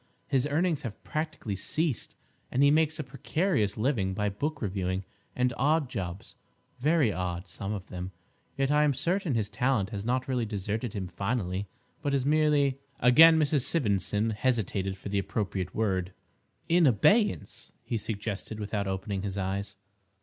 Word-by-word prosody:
His 135 Hz, -1 st, +1 dB
earnings 160 Hz, +1 st, +1 dB
have 110 Hz, -4 st, -7 dB
practically 155 Hz, -10 st, -3 dB
ceased, 150 Hz, -, -1 dB, 0.4 s
and 130 Hz, -, +3 dB
he 140 Hz, -, +6 dB
makes 155 Hz, 0 st, +3 dB
a 155 Hz, -, -3 dB
precarious 135 Hz, -, 0 dB
living 110 Hz, -6 st, 0 dB
by 105 Hz, +1 st, 0 dB
book 145 Hz, +9 st, -3 dB
reviewing 95 Hz, -2 st, -2 dB, 0.3 s
and 125 Hz, -1 st, +1 dB
odd 145 Hz, 0 st, +2 dB
jobs—very 120 Hz, -, -2 dB
odd, 90 Hz, 0 st, -3 dB
some 100 Hz, +3 st, -5 dB
of 100 Hz, -3 st, -4 dB
them. 90 Hz, +1 st, -5 dB, 0.5 s
Yet, 135 Hz, 0 st, +1 dB
I 150 Hz, 0 st, +4 dB
am 145 Hz, -2 st, +2 dB
certain 170 Hz, +1 st, 0 dB
his 110 Hz, -3 st, +1 dB
talent 110 Hz, -1 st, 0 dB
has 100 Hz, -3 st, -4 dB
not 125 Hz, +3 st, 0 dB
really 125 Hz, -4 st, 0 dB
deserted 105 Hz, +2 st, -3 dB
him 95 Hz, -3 st, -3 dB
finally, 100 Hz, 0 st, -2 dB, 0.3 s
but 145 Hz, -2 st, 0 dB
is 135 Hz, -2 st, 0 dB
merely—" 145 Hz, -2 st, +3 dB, 0.2 s
Again 160 Hz, +7 st, +8 dB
Mrs. 150 Hz, -2 st, +2 dB
Sivendson 105 Hz, -, +1 dB
hesitated 105 Hz, -5 st, -1 dB
for 100 Hz, -, -7 dB
the 100 Hz, 0 st, +1 dB
appropriate 95 Hz, -2 st, -3 dB
word. 95 Hz, -4 st, 0 dB, 0.5 s
"In 170 Hz, -1 st, +5 dB
abeyance," 135 Hz, -, +2 dB
he 115 Hz, -, -2 dB
suggested, 105 Hz, 0 st, -4 dB
without 105 Hz, -1 st, -2 dB
opening 95 Hz, +1 st, -2 dB
his 100 Hz, -1 st, -4 dB
eyes. 100 Hz, +1 st, -3 dB
110 Hz, 155 wpm, -29 LUFS, 100-145 Hz, 0.5 s, Again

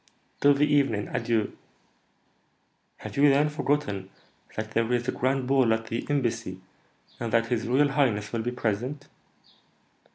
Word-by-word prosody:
"Till 145 Hz, 0 st, +5 dB
the 145 Hz, +1 st, +3 dB
evening, 140 Hz, -8 st, +1 dB
adieu." 115 Hz, -3 st, -1 dB, 1.4 s
"Have -, -, -9 dB
you, 145 Hz, +1 st, +6 dB
then, 145 Hz, +2 st, +3 dB
forgotten 145 Hz, -10 st, -1 dB, 0.5 s
that 110 Hz, 0 st, -4 dB
there 115 Hz, +1 st, 0 dB
is 120 Hz, -1 st, 0 dB
a -, -, +2 dB
grand 130 Hz, +1 st, 0 dB
ball 130 Hz, -4 st, +3 dB
at 115 Hz, 0 st, -6 dB
the 115 Hz, +1 st, -3 dB
Embassy, 115 Hz, -9 st, -1 dB, 0.6 s
and 115 Hz, -1 st, -3 dB
that 115 Hz, 0 st, +2 dB
his 120 Hz, -2 st, -1 dB
royal 140 Hz, +4 st, +3 dB
highness 120 Hz, -8 st, 0 dB
will 115 Hz, -, 0 dB
be 120 Hz, +2 st, -2 dB
present?" 125 Hz, +5 st, -3 dB
120 Hz, 150 wpm, -27 LUFS, 110-140 Hz, 1.4 s, you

